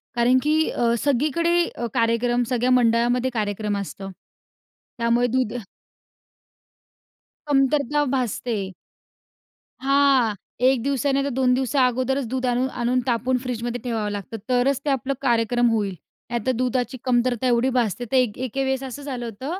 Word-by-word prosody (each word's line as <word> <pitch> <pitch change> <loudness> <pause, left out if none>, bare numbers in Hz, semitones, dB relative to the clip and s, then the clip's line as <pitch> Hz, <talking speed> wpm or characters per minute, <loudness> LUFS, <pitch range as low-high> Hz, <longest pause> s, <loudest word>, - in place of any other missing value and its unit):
कारण 245 +2 +4
की 305 +1 +2
अ, 235 -1 +1
सगळीकडे 310 +6 +2
अ, 235 - -3
कार्यक्रम 240 +1 +1
सगळ्या 250 0 +1
मंडळामध्ये 245 +1 +3
कार्यक्रम 210 -1 -2
असतं. 195 0 -6 0.9
त्यामुळे 235 +1 +2
दूध 255 -2 0 1.9
कमतरता 285 +1 +2
भासते. 225 -5 -2 1.1
हां. 270 -5 +3 0.3
एक 260 -2 +4
दिवसा 280 0 0
नाही 275 0 +1
तर - - -1
दोन 250 -1 +3
दिवसा 260 +1 +2
अगोदरच 255 +2 -1
दूध 255 +1 -2
आणून 250 +1 +1
आणून 250 +2 +2
तापून 250 +2 +1
फ्रिजमध्ये 240 -1 -3
ठेवावं 225 -4 -2
लागतं, 205 +3 -6
तरच 255 +2 +2
ते - - +1
आपलं 270 0 0
कार्यक्रम 240 -1 +2
होईल. 205 -4 -1 0.3
नाहीतर 240 +1 -1
दुधाची 255 +1 -1
कमतरता 250 0 +1
एवढी 245 +2 +2
भासते 245 -2 0
तर - - +1
एक 245 -5 +1
एके 260 +1 -2
वेळेस 265 0 -1
असं 265 +2 -7
झालं 255 -4 -5
होतं 265 - -5
250 Hz, 140 wpm, -23 LUFS, 235-265 Hz, 1.9 s, कारण